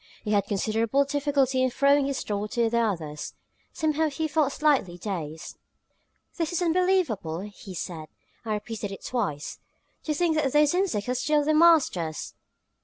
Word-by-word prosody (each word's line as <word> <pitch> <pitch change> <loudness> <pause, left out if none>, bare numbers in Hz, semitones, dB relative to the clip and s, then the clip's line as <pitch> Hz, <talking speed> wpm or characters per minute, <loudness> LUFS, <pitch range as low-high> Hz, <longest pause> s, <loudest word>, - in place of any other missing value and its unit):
He 210 - -3
had 200 -1 +2
considerable 225 +6 +1
difficulty 275 -2 +1
in 255 - +3
throwing 280 +2 +3
his 275 -1 -2
thought 205 0 -3
to 230 -2 +1
the 235 - +2
others; 165 -10 -3 0.4
somehow 315 -1 0
he 315 +2 -2
felt 300 -2 +1
slightly 270 - +1
dazed. 165 -5 -6 0.8
"This 330 -1 -1
is 350 - -1
unbelievable!" 330 - +1
he 200 -1 -9
said, 160 -2 -5 0.4
and 220 -2 -2
repeated 210 -1 -4
it 195 - -9
twice. 195 - -3 0.5
"To 305 - -1
think 330 -1 +1
that 280 -4 0
those 295 +1 +4
insects 355 - 0
are 250 - +1
still 295 +4 +1
the 310 - +2
masters!" 305 - +3
255 Hz, 160 wpm, -26 LUFS, 200-305 Hz, 0.8 s, those